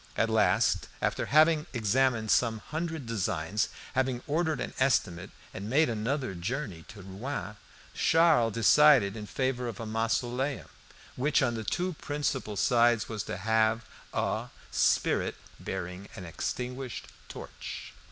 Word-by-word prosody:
At 115 0 +2
last, 110 -1 +2
after - - -1
having 155 +1 +4
examined 115 -1 +1
some 115 -2 +3
hundred 160 +4 -4
designs, 105 -2 -1 0.2
having 130 -1 0
ordered 160 +1 0
an - - -4
estimate 95 -9 +1 0.2
and 100 +3 -6
made 150 +3 +3
another 120 +2 -2
journey 95 - -4
to 100 -2 -11
Rouen, 105 +3 -5 0.4
Charles 160 -9 +4
decided 115 -2 +5
in 105 -2 -7
favour 130 +1 -1
of 115 -4 -6
a 115 - -4
mausoleum, 120 +4 -1 0.5
which 140 +4 +2
on 120 - +1
the 110 -1 -4
two 180 - -1
principal 140 -7 -2
sides 120 +1 +3
was 110 -2 -4
to - - -4
have 110 +1 +1 0.3
a - - -1 0.2
"spirit - - +2 0.2
bearing 90 +1 -5
an 90 - -8
extinguished 125 +8 -4 0.2
torch." - - -8
120 Hz, 135 wpm, -29 LUFS, 105-135 Hz, 0.5 s, decided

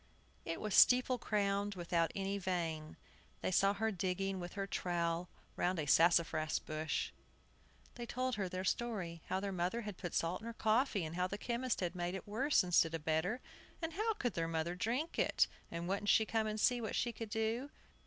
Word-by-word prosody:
It 165 - -3
was 215 -2 -3
steeple 250 +2 +6
crowned, 200 -1 0
without 170 -2 0
any 195 +1 -1
vane. 165 -5 -2 0.4
They - - 0
saw 195 +2 +4
her 220 +2 0
digging 195 0 -1
with 175 -1 -6
her 195 -1 -2
trowel 175 -2 -1 0.3
round 180 +1 0
a 155 - -1
sassafras 165 0 +4
bush. 155 0 -2 0.8
They 240 -1 -7
told 255 +2 -1
her 200 -4 -1
their 185 +1 -3
story, 190 -6 -2
how 190 - 0
their 200 0 -3
mother 185 +6 -1
had 210 -4 -7
put 175 -3 -4
salt 170 +4 0
in 225 - -7
her 230 - -4
coffee, 220 - +2
and 160 +1 -6
how 180 +1 +1
the 200 - -4
chemist 240 +2 -1
had 175 -2 -1
made 175 0 -2
it 190 - -7
worse 255 +5 +3
instead 170 -2 +3
of 160 -1 -6
better, 175 +10 0 0.4
and 325 -1 -3
how 435 +5 +1
their 170 - -1
mother 165 +1 -1
couldn't 180 +1 -8
drink 255 +9 -1
it, - - +4 0.2
and 170 +1 -4
wouldn't 200 +2 -1
she 220 - +5
come 220 0 0
and 215 0 -2
see 245 +2 +3
what 220 - -3
she 240 - 0
could 225 -2 -6
do? 225 +5 -1
195 Hz, 200 wpm, -36 LUFS, 175-225 Hz, 0.8 s, steeple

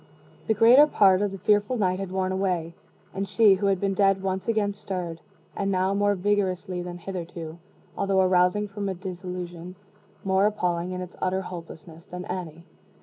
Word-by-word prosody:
The 220 - +2
greater 245 +8 +7
part 195 -8 +4
of 205 -1 0
the 195 - -6
fearful 210 +6 +2
night 185 -3 0
had 195 -2 -5
worn 185 0 -1
away, 180 -3 -1 0.4
and 195 0 -3
she 215 -2 +5
who 200 +1 0
had 195 -2 +2
been 195 0 0
dead 195 -1 +2
once 190 0 -2
again 215 -3 +1
stirred 180 -5 -5 0.3
and 195 - -1
now 190 +1 +1
more 205 0 +2
vigorously 185 -2 -1
than 175 0 -6
hitherto, 170 -2 -7 0.4
although 195 -1 +1
arousing 185 +2 +3
from 200 0 -4
a 190 - -3
dissolution 180 -1 -7 0.5
more 195 +1 +3
appalling 180 -4 -1
in 185 0 -4
its 180 0 -8
utter 185 +1 0
hopelessness 165 -2 -10
than 180 0 -7
any. 170 -2 -6
190 Hz, 175 wpm, -25 LUFS, 180-200 Hz, 0.5 s, greater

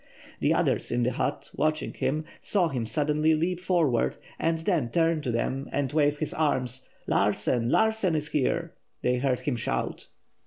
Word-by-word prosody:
The - - +2
others - - +1
in 120 - +1
the 125 - +2
hut, - - -2
watching 155 0 0
him, 155 +3 -1
saw 185 -5 +1
him 125 -6 -2
suddenly 150 +5 +2
leap 170 +3 0
forward 170 -10 +1 0.2
and 165 0 +1
then 160 - 0
turn 165 +2 +2
to 130 -5 -2
them 130 +4 -2
and 140 -1 -1
wave 150 -1 +3
his 155 0 -3
arms. 130 -5 -1 0.2
"Larsen! 115 +4 +1
Larsen 220 - +2
is 150 -1 -2
here!" 165 +4 0 0.3
they 125 0 +2
heard 130 -1 0
him 145 - -1
shout. - - -3
150 Hz, 165 wpm, -27 LUFS, 125-165 Hz, 0.3 s, wave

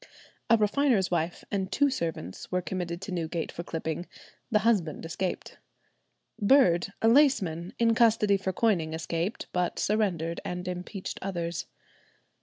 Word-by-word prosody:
A 230 - +7
refiner's 215 -2 +2
wife 170 0 -1
and 195 -1 -1
two 285 -1 +3
servants 165 - -4
were 180 0 0
committed 175 0 -4
to 195 - -6
Newgate 165 -1 -2
for - - -6
clipping; 165 0 -4 0.4
the 215 - +4
husband 180 -10 +1
escaped. 180 +3 -4 0.8
Bird, 200 -6 +4
a - - +5
laceman, 215 - +3
in 230 -1 +3
custody 220 -3 +4
for 190 -1 -2
coining, 180 -7 +1
escaped; 165 +5 -3
but 180 -1 0
surrendered 180 -6 0
and 180 0 -4
impeached 180 +2 -5
others. 175 -3 -3
180 Hz, 135 wpm, -28 LUFS, 170-215 Hz, 0.8 s, A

